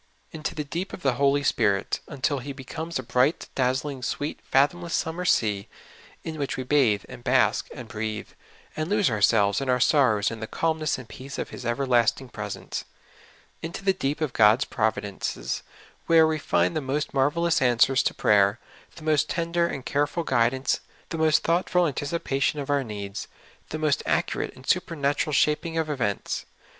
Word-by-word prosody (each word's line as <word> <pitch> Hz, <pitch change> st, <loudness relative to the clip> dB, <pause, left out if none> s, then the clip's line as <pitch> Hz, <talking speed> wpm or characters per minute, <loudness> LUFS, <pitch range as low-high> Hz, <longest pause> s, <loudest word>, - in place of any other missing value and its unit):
Into 155 Hz, -1 st, -5 dB
the 150 Hz, -, -2 dB
deep 170 Hz, +6 st, -4 dB
of 180 Hz, -, -8 dB
the 135 Hz, -2 st, +3 dB
Holy 140 Hz, 0 st, +3 dB
Spirit, 100 Hz, -7 st, +1 dB
un 145 Hz, -4 st, -9 dB
til 140 Hz, +2 st, +1 dB
He 140 Hz, +3 st, -6 dB
becomes 160 Hz, +5 st, -5 dB
a 130 Hz, -, -4 dB
bright, 125 Hz, +5 st, +1 dB
dazzling, 130 Hz, +1 st, -1 dB
sweet, 145 Hz, +4 st, -3 dB
fathomless 165 Hz, +5 st, +1 dB
summer 170 Hz, +3 st, -2 dB
sea, 105 Hz, -, +1 dB, 0.6 s
in 160 Hz, -1 st, -5 dB
which 140 Hz, -, -2 dB
we 130 Hz, -, -2 dB
bathe 125 Hz, -7 st, +3 dB
and 120 Hz, -, -11 dB
bask 125 Hz, 0 st, +2 dB
and 125 Hz, -5 st, -8 dB
breathe, 110 Hz, -2 st, -4 dB, 0.5 s
and 155 Hz, +2 st, -2 dB
lose 205 Hz, -, +2 dB
ourselves 105 Hz, 0 st, +3 dB
and 135 Hz, -, -3 dB
our 125 Hz, 0 st, +3 dB
sorrows 125 Hz, -7 st, +3 dB
in 115 Hz, -, -6 dB
the 110 Hz, -, -5 dB
calmness 160 Hz, 0 st, 0 dB
and 130 Hz, -3 st, -10 dB
peace 130 Hz, +5 st, -9 dB
of -, -, -4 dB
His -, -, -6 dB
everlasting 120 Hz, 0 st, +1 dB
presence. 105 Hz, -3 st, -5 dB, 0.8 s
Into 170 Hz, +4 st, -6 dB
the 195 Hz, -, +4 dB
deep 150 Hz, -4 st, -2 dB
of 150 Hz, -5 st, -1 dB
God's 110 Hz, +4 st, +5 dB
providences, 110 Hz, -3 st, -2 dB, 0.5 s
where 165 Hz, -1 st, +6 dB
we 160 Hz, 0 st, 0 dB
find 90 Hz, -9 st, +1 dB
the 155 Hz, -, 0 dB
most 140 Hz, +3 st, -2 dB
marvelous 150 Hz, +4 st, +2 dB
answers 125 Hz, +1 st, +4 dB
to -, -, -1 dB
prayer, 100 Hz, 0 st, +4 dB, 0.4 s
the 165 Hz, -, -11 dB
most 155 Hz, -1 st, +2 dB
tender 170 Hz, 0 st, 0 dB
and 135 Hz, -6 st, -5 dB
careful 145 Hz, +4 st, 0 dB
guid 120 Hz, -5 st, +3 dB
ance, 130 Hz, 0 st, -1 dB, 0.3 s
the 165 Hz, -, -4 dB
most 155 Hz, -1 st, +3 dB
thoughtful 175 Hz, +1 st, +2 dB
anticipation 145 Hz, -1 st, -1 dB
of 140 Hz, 0 st, -3 dB
our 140 Hz, -1 st, +2 dB
needs, 100 Hz, -3 st, -6 dB, 0.4 s
the 155 Hz, -, -3 dB
most 155 Hz, -2 st, +1 dB
accurate -, -, -1 dB
and 130 Hz, -, -14 dB
supernatural 150 Hz, -5 st, 0 dB
vShaping 160 Hz, +3 st, +1 dB
of 155 Hz, -1 st, -1 dB
events. 110 Hz, -8 st, -2 dB
140 Hz, 175 wpm, -26 LUFS, 120-155 Hz, 0.8 s, where